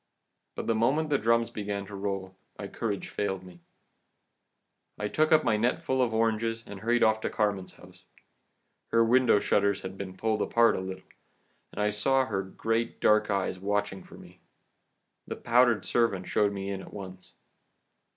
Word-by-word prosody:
But - - -5
the 115 - +1
moment 140 +8 +1
the 145 - +3
drums 115 +1 +2
began 100 -1 -4
to 100 - -12
roll, 95 -1 -4 0.2
my 100 - -6
courage 105 -2 -4
failed 95 -2 -3
me. 90 -2 -14 1.4
I 105 - -2
took 155 +8 +1
up 155 -1 +5
my 110 -3 +2
net 120 +4 0
full 130 0 0
of 120 -3 +1
oranges, 115 0 0
and 100 -1 -9
hurried 120 +3 +2
off 110 0 +3
to - - -2
Carmen's 100 -3 -1
house. - - -17 0.8
Her 115 0 +3
window 125 -2 +4
shutters 100 0 +1
had 95 0 -7
been 95 -2 -7
pulled 110 +1 0
apart 115 0 +3
a - - -2
little, 95 0 -7 0.7
and - - -9
I 105 - +2
saw 130 +6 +2
her 100 -5 -2
great 115 +4 -2
dark 105 0 +3
eyes 95 -2 -1
watching 100 0 -2
for - - -14
me. - - -15 0.9
The - - -4
powdered 120 -1 +3
servant 110 -6 +1
showed 105 -1 +2
me 100 0 -4
in 95 -1 -4
at - - -12
once. 95 -2 -10
105 Hz, 175 wpm, -28 LUFS, 100-115 Hz, 1.4 s, up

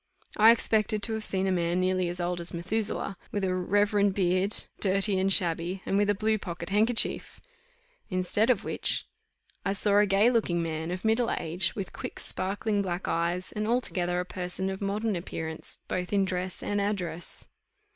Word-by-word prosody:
I 220 +1 +7
expected 215 -2 +2
to 225 - +1
have 220 0 -2
seen 190 -2 +1
a 190 - +1
man 175 0 0
nearly 185 -1 +1
as 175 +1 -5
old 175 0 -2
as 170 - +1
Methuselah, 200 +2 -2
with 205 - -2
a 185 -1 +1
reverend 205 +2 +2
beard, 185 +2 +1 0.2
dirty 195 0 +2
and 190 +1 +1
shabby, 175 0 +1
and - - -1
with 205 +1 +2
a 205 - +3
blue 215 +2 +1
pocket 170 -3 -6
handkerchief. 220 +4 +3 0.7
Instead 185 +4 +2
of 245 -6 +2
which - - -1 0.6
I 195 - 0
saw 200 +1 +4
a 210 - +4
gay 200 +5 +4
looking 210 -8 +1
man, 160 0 -3
of 180 +4 -5
middle 225 +2 +2
age, 175 +2 -1
with 195 -3 -5
quick - - -7
sparkling 205 +2 -1
black 180 -1 -3
eyes, 170 +2 -1
and 215 0 -3
altogether 180 -7 0
a 180 - -2
person 180 +1 -3
of 190 - -6
modern 205 +2 -1
appearance, 160 -2 -5
both 180 0 -3
in 200 -1 +2
dress 185 0 -3
and 205 0 -1
address. 180 -5 -3
190 Hz, 180 wpm, -28 LUFS, 180-205 Hz, 0.7 s, I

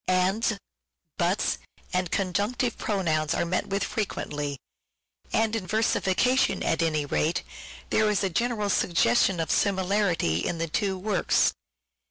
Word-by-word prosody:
" - - -40
Ands," 190 +5 +2 0.3
" - - -56
buts," - - +1 0.3
and 180 -1 0
Conjunctive 205 +7 0
Pronouns 165 -6 0
are - - 0
met 180 +2 -1
with 200 0 -1
frequently; 150 -9 -3 0.7
and 225 0 +1
in 195 -5 -3
versification, 220 +1 +2
at 165 - +1
any 155 -3 +1
rate, 155 +4 0 0.5
there 215 -1 +3
is 210 -1 +1
a 195 - +1
general 215 +1 0
suggestion 185 +1 +2
of 165 - -1
similarity 190 - +1
in 170 - -2
the 165 0 -2
two 190 +3 -1
works. 190 -1 +2
190 Hz, 140 wpm, -26 LUFS, 165-210 Hz, 0.7 s, there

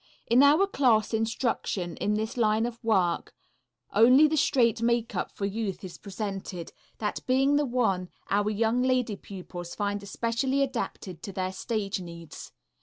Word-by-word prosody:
In 240 +3 +5
our 295 +7 +6
class 245 - +2
instruction 220 -5 -1
in 210 - 0
this 220 +3 -2
line 220 -1 +2
of 240 0 -6
work 190 -6 +1 0.6
only 255 +7 +7
the 310 - 0
"straight" 235 -6 +2
makeup 235 0 0
for 200 - -4
youth 200 -1 -3
is 185 -2 -8
presented, 195 -4 -5 0.3
that 210 -1 -2
being 270 +2 +3
the 290 -1 +2
one 210 -8 0 0.2
our 205 +1 +1
young 225 +3 +1
lady 255 -4 +1
pupils 180 -3 -8
find 205 -1 -2
especially 230 +7 0
adapted 230 -9 -4
to 200 - -6
their 185 0 -2
stage 205 0 -2
needs. 170 -2 -9
220 Hz, 150 wpm, -27 LUFS, 195-245 Hz, 0.6 s, only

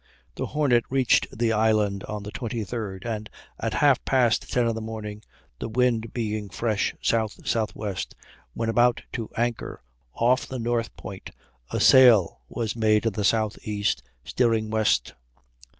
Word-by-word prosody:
The - - -4
Hornet 135 -6 +2
reached 130 -2 +3
the 115 0 0
island 105 -2 +2
on 105 -1 -5
the 105 - -7
23d, 110 -5 -4
and 110 -2 -4 0.3
at - - -2
half 140 -3 +4
past 125 -4 +2
ten 120 -2 +2
in 115 - +1
the 110 - -5
morning, 110 -1 -6 0.4
the - - -4
wind 115 -1 +1
being 110 -3 -3
fresh 105 +2 -1
S.S.W., 110 -1 -1 0.6
when 115 - -2
about 120 +2 +3
to 115 -3 -4
anchor 120 - -2 0.3
off 125 +3 +2
the 130 - -5
north 115 -1 -2
point, 95 0 -8 0.4
a - - -2
sail 120 - +6
was 115 -2 -3
made 110 -1 +2
in 115 - +1
the 105 - -2
southeast, 105 - 0 0.2
steering 115 -3 +1
west. 110 - +1
110 Hz, 145 wpm, -25 LUFS, 105-120 Hz, 0.6 s, sail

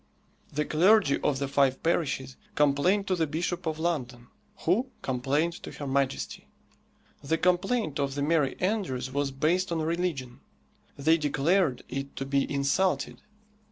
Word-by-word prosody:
The 150 +1 -1
clergy 185 -1 +4
of 145 - +1
the 140 0 -2
five 135 -1 +2
parishes 140 -6 0 0.2
complained 150 +8 +3
to 190 - +1
the 165 -3 0
Bishop 170 +3 -2
of 155 -1 -1
London, 130 -8 -3 0.3
who 225 +10 +1
complained 140 +6 0
to - - -8
her 145 - -6
Majesty. 135 -1 -1 0.8
The 160 +4 +1
complaint 180 - +1
of 140 -1 -1
the 140 - -1
merry 150 -3 +1
andrews 165 - -1
was 140 0 0
based 170 +7 0
on 165 -1 0
religion. 160 -7 -2 0.6
They 160 +4 +3
declared 150 0 +1
it 135 +2 -5
to 135 - -4
be 140 0 0
insulted. 140 +7 0
150 Hz, 145 wpm, -28 LUFS, 135-175 Hz, 0.8 s, clergy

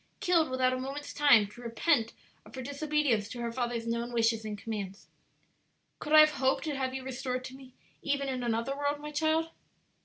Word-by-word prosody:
killed 335 -4 +2
without 255 0 +1
a 255 - -2
moment's 275 +3 -6
time 280 -8 +6
to 210 +4 -13
repent 230 0 +1 0.3
of - - -14
her 260 - -5
disobedience 285 -6 0
to 250 - -7
her 235 -1 -2
father's 240 -1 -2
known 235 +1 -2
wishes 225 -1 +1
and 210 -1 -5
commands? 200 -2 -6 0.9
Could 300 - -3
I 310 - +10
have 305 0 +6
hoped 265 -2 +1
to 305 -3 -2
have 260 -1 -2
you 265 - -5
restored 255 -1 -3
to 260 - -8
me 260 -1 -15 0.3
even 280 -1 -1
in 260 -2 -2
another 235 +3 -1
world, 285 +1 -1
my 300 0 -7
child?" 315 +2 +1
260 Hz, 195 wpm, -30 LUFS, 235-290 Hz, 0.9 s, I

